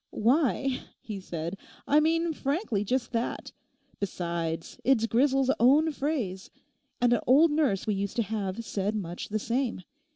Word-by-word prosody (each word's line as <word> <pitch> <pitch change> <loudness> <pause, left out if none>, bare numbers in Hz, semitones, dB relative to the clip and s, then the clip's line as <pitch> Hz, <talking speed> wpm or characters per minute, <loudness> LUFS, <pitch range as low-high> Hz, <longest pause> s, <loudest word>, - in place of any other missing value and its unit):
'Why,' 265 +2 +1 0.2
he 210 -3 -6
said, 170 0 -5 0.3
'I 295 - +5
mean 330 +1 +1
frankly 275 - -1
just 245 +3 -1
that. 235 -1 -3 0.5
Besides, 170 -4 -3
it's 245 -4 +3
Grisel's 270 +3 +3
own 290 +7 +5
phrase; 260 -11 -3 0.5
and 245 -1 +4
an 240 - +3
old 295 +5 +6
nurse 290 -11 +1
we 215 - +1
used 200 0 -3
to 235 - +2
have 210 0 -3
said 205 +1 -2
much 175 -4 -5
the 215 - 0
same. 235 -2 -2
230 Hz, 150 wpm, -28 LUFS, 200-275 Hz, 0.5 s, old